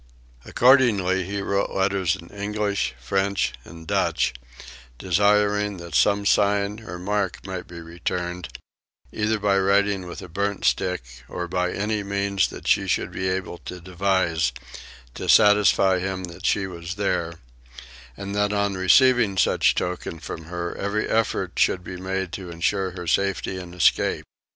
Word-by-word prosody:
Accordingly 105 -8 +4
he 100 +1 -3
wrote 100 0 0
letters 95 -3 +1
in 85 - -12
English, 100 -7 -2
French, 95 +10 0
and 80 +3 -12
Dutch 65 - +1 0.6
desiring 105 +3 +2
that 85 -2 -9
some 100 +10 +3
sign 100 +1 +2
or 90 -6 -8
mark 100 +1 -2
might 95 -2 -6
be 85 -1 -9
returned, 85 +1 -4 0.6
either 110 +1 0
by 100 -1 +2
writing 100 -1 +2
with 90 - -8
a - - -8
burnt 100 +3 -2
stick 90 -4 +1 0.3
or 90 0 -4
by 90 0 -1
any 105 +1 -1
means 100 -1 0
she - - +2
should - - 0
be 95 0 -2
able 95 -2 -3
to 90 - -8
devise, 90 -2 0 0.6
to - - -6
satisfy 100 -2 +5
him 95 0 -3
that 90 0 -5
she 100 - +1
was 85 -1 -6
there; 85 -5 -1 0.8
and 100 0 -6
that 105 0 +1
on 100 -1 0
receiving 105 +2 +4
such - - +3
token 90 -2 -3
from 80 0 -8
her 85 +1 -4
every 100 +2 -1
effort 115 -1 0
should 90 - +2
be 90 - -7
made 95 -1 -3
to 95 -3 -7
ensure 95 +3 -1
her 90 -1 -8
safety 100 +2 0
and 90 -1 -9
escape. 90 - +2
95 Hz, 150 wpm, -24 LUFS, 90-100 Hz, 0.8 s, satisfy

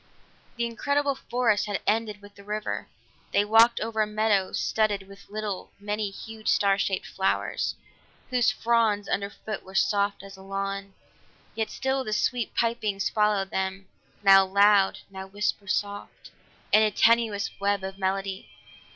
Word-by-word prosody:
The 235 -1 -1
incredible 285 +4 0
forest 240 -5 0
had 205 -1 -2
ended 210 -1 0
with 205 0 -13
the 200 - -15
river; 210 +1 -4 0.5
they 205 - +3
walked 225 +2 +5
over 220 0 -1
a 215 - +1
meadow 210 -3 +1
studded 205 -3 0
with 195 0 -15
little, 210 -2 -5
many 210 0 -2
hued, 220 +2 -10
star 200 -1 +3
shaped 190 -1 -1
flowers, 190 0 -1 0.6
whose 250 -2 +3
fronds 220 -2 +1
underfoot 200 +1 -3
were 190 +1 -14
soft 200 +1 +1
as 195 0 -11
a 190 - -14
lawn. 195 0 -4 0.6
Yet 220 -1 -2
still 265 0 -1
the 215 - -3
sweet 235 +2 -1
pipings 220 -4 0
followed 210 -2 +1
them, 190 0 -3 0.3
now 195 -1 +8
loud, 200 +1 +4
now 190 0 -7
whisper 205 +1 -2
soft, 205 +1 -4 0.4
in 215 - +6
a 215 - +4
tenuous 220 -1 +2
web 200 -1 0
of 190 0 -6
melody. 195 0 -2
205 Hz, 150 wpm, -26 LUFS, 195-220 Hz, 0.6 s, now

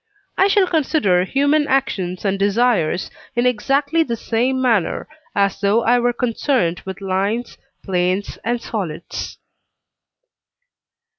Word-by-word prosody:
I 385 - +4
shall 400 -1 +4
consider 280 - +2
human 285 +6 +2
actions 190 -9 -1
and 195 0 0
desires 200 -4 +1 0.2
in 240 +1 +1
exactly 275 +7 +1
the 240 -7 -1
same 245 +4 0
manner, 230 -8 +1 0.3
as 200 0 +1
though 210 +3 +2
I 245 +1 +4
were 245 0 +2
concerned 240 - 0
with 190 +1 -7
lines, 200 +5 -1 0.3
planes, 185 +1 -1
and 240 +1 -1
solids. 190 -9 -5
230 Hz, 120 wpm, -20 LUFS, 195-260 Hz, 0.3 s, I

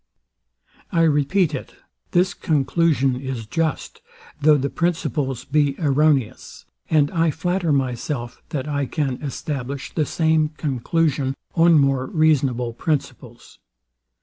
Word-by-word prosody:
I 165 -1 +3
repeat 155 +3 +2
it: 135 - -6 0.3
This 180 +1 +2
conclusion 145 -3 +1
is 130 -4 -5
just, 160 +7 -3 0.4
though 150 0 +6
the 140 -1 -2
principles 140 -4 -1
be 145 -1 +1
erroneous; 145 -5 0 0.2
and 150 -2 +3
I 165 -1 +2
flatter 175 +2 -1
myself, 125 -2 -2
that 140 -1 -3
I 140 -2 -1
can 135 -4 -2
establish 140 -1 -5
the 155 -3 0
same 160 -2 +2
conclusion 140 0 0 0.2
on 165 -1 +5
more 135 -2 +2
reasonable 135 -7 +1
principles. 135 -4 -4
145 Hz, 115 wpm, -22 LUFS, 135-160 Hz, 0.4 s, though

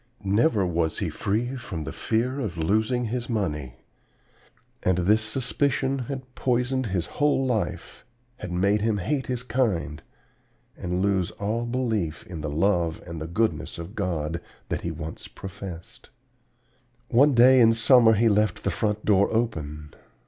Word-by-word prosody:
Never 105 +1 +3
was 85 -2 0
he - - -2
free 120 +6 -1
from 90 -10 -5
the - - -5
fear 125 +5 -1
of 105 -10 -3
losing 110 +9 +1
his 120 +2 -3
money. 75 - -2 1.1
And 90 -1 +2
this 105 +5 +3
suspicion 135 +3 0
had 130 0 -6
poisoned 125 0 0
his 95 -4 -1
whole 145 -2 +1
life, 120 -5 -3 0.3
had 90 - -7
made 100 +4 +2
him 110 -1 +1
hate 130 +6 -1
his 125 -1 -2
kind 105 - -1 0.7
and 90 +1 -2
lose 95 -3 +1
all 115 +4 -3
belief 110 -10 -2
in 85 -4 -7
the 75 - -3
love 85 +1 +1
and 85 -2 -7
the 80 - -4
goodness 110 +7 -1
of 85 +4 -7
God, 85 -6 -2 0.3
that - - -2
he 85 - -3
had 80 - -6
once 80 -1 -7
professed. 95 -3 -9 1.0
"One 135 +3 +5
day 130 +2 +7
in 115 -1 +7
summer 115 0 +6
he 115 +2 +3
left 105 0 +2
the - - 0
front 105 0 -1
door 100 -1 +4
open. 75 -10 -2
105 Hz, 155 wpm, -25 LUFS, 85-120 Hz, 1.1 s, day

